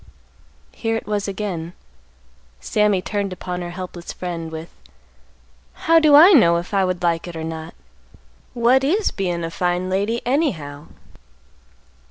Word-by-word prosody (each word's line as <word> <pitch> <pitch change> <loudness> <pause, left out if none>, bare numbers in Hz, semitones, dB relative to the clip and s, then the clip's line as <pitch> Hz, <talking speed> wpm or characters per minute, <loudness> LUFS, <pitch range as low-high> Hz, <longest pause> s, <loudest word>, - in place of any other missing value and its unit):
Here 225 -1 -2
it 225 - -4
was 205 -1 -2
again. 185 -4 -4 0.9
Sammy 210 -3 +1
turned 200 -2 -2
upon 180 0 -5
her 175 - -5
helpless 175 -1 -7
friend, 170 -3 -5
with, 160 +1 -8 1.1
"How 330 0 +6
do 305 -2 +5
I 335 +7 +9
know 170 - +6
if 175 +4 -6
I 195 -1 +3
would 185 -1 -2
like 170 0 0
it 175 - -8
or 160 - -5
not? 160 0 -6 0.8
What 245 +3 +3
is 385 +10 +1
bein' 175 -3 -2
a 165 - -4
fine 180 +1 -1
lady, 205 +5 0
anyhow?" 170 - -1
185 Hz, 145 wpm, -21 LUFS, 170-225 Hz, 1.1 s, I